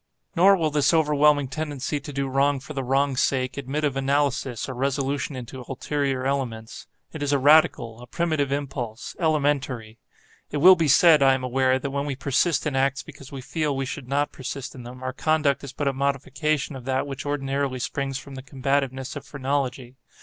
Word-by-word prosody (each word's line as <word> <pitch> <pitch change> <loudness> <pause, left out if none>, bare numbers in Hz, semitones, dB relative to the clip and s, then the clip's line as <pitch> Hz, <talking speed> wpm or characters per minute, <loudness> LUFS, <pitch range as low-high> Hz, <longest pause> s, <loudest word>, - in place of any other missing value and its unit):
Nor 195 +3 +6
will 160 -3 0
this 145 +2 +3
overwhelming 150 -2 +3
tendency 145 0 -3
to 145 +1 -8
do 140 0 -2
wrong 135 +1 +2
for 150 +4 -9
the 135 -2 -3
wrong's 135 +1 +1
sake, 130 -1 0
admit 140 +2 -3
of 145 -3 0
analysis, 135 -3 0
or 130 - -5
resolution 140 +2 -1
into 125 +1 -7
ulterior 135 -1 -2
elements. 120 -5 -3 0.3
It 160 - -7
is 145 -1 0
a 140 - +4
radical, 135 -5 +4
a 125 - -11
primitive 155 -4 -1
impulse—elementary. 135 -2 -2 0.5
It 150 - -3
will 185 +6 +8
be 165 -3 +1
said, 155 +2 +6
I 135 -1 +5
am 130 - -5
aware, 130 +1 +2
that 135 +1 -4
when 140 +1 -2
we 140 - -2
persist 140 +5 +1
in 150 -3 -1
acts 135 +1 +1
because 140 -3 -13
we 135 -2 -6
feel 150 +1 -2
we 135 - -1
should 130 -1 -6
not 145 +2 0
persist 135 0 -6
in 130 - -10
them, 125 +2 -10
our 130 0 -3
conduct 155 -2 +1
is 140 - -7
but 145 +1 -3
a 140 - +1
modification 140 +2 -1
of 130 -2 -9
that 130 +1 0
which 135 -2 -6
ordinarily 140 -2 -2
springs 135 +1 -3
from 135 +1 -10
the 130 - -7
combativeness 135 0 -2
of 145 - -6
phrenology. 135 -2 -3
140 Hz, 195 wpm, -24 LUFS, 130-145 Hz, 0.5 s, will